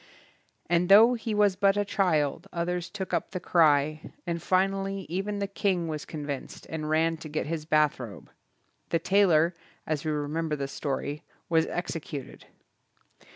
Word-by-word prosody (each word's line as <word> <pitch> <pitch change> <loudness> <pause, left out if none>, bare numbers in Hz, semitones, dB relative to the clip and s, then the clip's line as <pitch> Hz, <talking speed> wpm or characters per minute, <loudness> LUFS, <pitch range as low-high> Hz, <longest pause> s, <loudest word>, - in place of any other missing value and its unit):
And 175 +1 +2
though 220 +5 +8
he 225 -2 -3
was 205 -2 +4
but 195 +1 +3
a 205 - +1
child 175 -4 0
others 175 0 -2
took 190 -3 -6
up 170 - 0
the 185 - -4
cry, 155 -3 +2
and 170 -1 -2
finally 195 +1 0
even 195 +4 -2
the 200 - -1
king 195 -3 -1
was 155 -2 -4
con 150 -2 -6
vinced 140 -2 -6
and 155 -1 -4
ran 165 +1 +2
to 155 -1 -9
get 155 +1 -2
his 155 0 -4
bathrobe. 150 -8 0 0.6
The 165 - +2
tailor, 175 -2 +3 0.3
as 155 -2 -2
we 155 - -2
remember 150 +1 -1
the 140 -1 -3
story, 145 +1 -3 0.3
was 165 -1 +3
executed. 160 -6 -5
165 Hz, 155 wpm, -28 LUFS, 155-195 Hz, 0.6 s, though